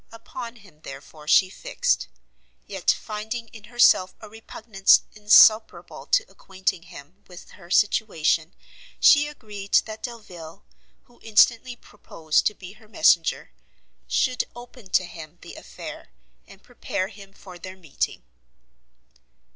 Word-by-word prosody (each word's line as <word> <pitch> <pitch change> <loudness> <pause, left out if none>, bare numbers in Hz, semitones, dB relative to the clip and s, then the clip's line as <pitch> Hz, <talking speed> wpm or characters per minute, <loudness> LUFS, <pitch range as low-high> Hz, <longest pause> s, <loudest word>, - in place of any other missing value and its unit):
Upon 230 +1 -9
him, 190 -9 -20
therefore, 150 +2 -12
she 185 +4 +4
fixed; - - -2 0.6
yet 195 -3 -4
finding 220 +2 -3
in 215 -1 -14
herself 220 -5 +3
a 215 - -11
repugnance 220 -2 +1
insuperable 215 +1 +4
to - - +2
acquainting 190 - -4
him 170 +2 -15
with 180 -1 -14
her 175 -3 -16
situation, 170 -5 +1 0.4
she 290 0 +6
agreed 210 -8 -6
that 220 0 -9
Delvile, 180 - -10 0.4
who 240 - -26
instantly 230 +3 +3
proposed 160 -9 -2
to 210 - -3
be 190 0 -12
her 215 +1 -20
messenger, 315 +9 +2 0.6
should 255 -1 0
open 240 -3 -13
to 185 - +2
him 165 -3 -11
the - - -11
affair, - - -10 0.4
and - - -17
prepare 185 +1 -4
him 200 -2 -14
for 185 -2 -14
their 185 +2 -10
meeting. 165 -7 -4
205 Hz, 125 wpm, -24 LUFS, 180-225 Hz, 0.6 s, she